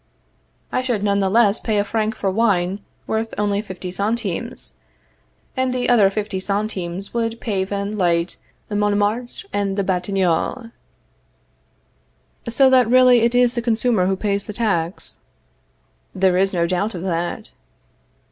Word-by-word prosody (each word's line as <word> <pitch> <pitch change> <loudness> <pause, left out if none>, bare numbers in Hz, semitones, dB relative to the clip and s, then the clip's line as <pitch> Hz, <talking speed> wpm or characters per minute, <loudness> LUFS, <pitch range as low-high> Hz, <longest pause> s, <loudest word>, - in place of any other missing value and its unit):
I - - +1
should 240 -5 -1
none 200 -1 +2
the 195 -1 +1
less 215 0 +4
pay 220 -3 -1
a 205 - +3
franc 220 +1 -1
for 195 -3 -1
wine 195 -3 +1 0.3
worth 220 +1 -2
only 205 -1 0
fifty 185 -3 -7
centimes, 205 0 -3 0.8
and 260 -1 0
the 250 -1 0
other 215 -5 +5
fifty 205 -1 -3
centimes 195 -2 -3
would 230 -1 -2
pave 195 -4 -2
and 200 +1 -2
light 170 -1 +1 0.3
Montmartre 210 - -1
and 200 -1 -1
the 200 - +1
Batignolles. 190 +5 -1 1.8
So 265 +4 +4
that 250 -3 +5
really 250 0 +6
it 235 +1 +2
is 245 -1 +4
the 240 - -1
consumer 225 -4 +1
who 190 - +1
pays 200 0 -2
the 210 - -5
tax? 195 -6 -2 1.0
There 185 -1 +3
is 190 +1 +3
no 170 -2 +1
doubt 185 +4 -1
of 175 - -5
that. 175 -2 -3
205 Hz, 145 wpm, -21 LUFS, 190-230 Hz, 1.8 s, really